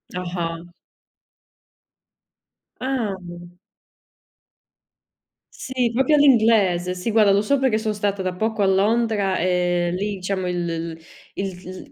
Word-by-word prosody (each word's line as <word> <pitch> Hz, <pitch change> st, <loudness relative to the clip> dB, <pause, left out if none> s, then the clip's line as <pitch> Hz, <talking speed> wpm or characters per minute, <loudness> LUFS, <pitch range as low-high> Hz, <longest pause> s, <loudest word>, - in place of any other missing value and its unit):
Ah-ah. 175 Hz, -2 st, -4 dB, 2.2 s
Ah. 255 Hz, -7 st, -2 dB, 2.4 s
Sì, 255 Hz, -3 st, -2 dB
proprio 265 Hz, +5 st, +2 dB
all'inglese, 220 Hz, -10 st, +4 dB
sì 185 Hz, +5 st, -4 dB
guarda, 215 Hz, -2 st, +4 dB
lo 200 Hz, +1 st, +3 dB
so 280 Hz, +7 st, +1 dB
perché 260 Hz, -5 st, +1 dB
son 215 Hz, -1 st, -2 dB
stata 200 Hz, -1 st, -1 dB
da 185 Hz, -1 st, -3 dB
poco 220 Hz, +2 st, -1 dB
a 195 Hz, -, +3 dB
Londra, 205 Hz, 0 st, +1 dB
ehm, 175 Hz, -1 st, 0 dB
lì 205 Hz, +3 st, -2 dB
diciamo 185 Hz, 0 st, -3 dB
il 175 Hz, -1 st, -2 dB
l 165 Hz, 0 st, -3 dB
l -, -, -11 dB, 0.4 s
il 185 Hz, -1 st, -6 dB
l -, -, -24 dB
195 Hz, 120 wpm, -22 LUFS, 180-225 Hz, 2.4 s, all'inglese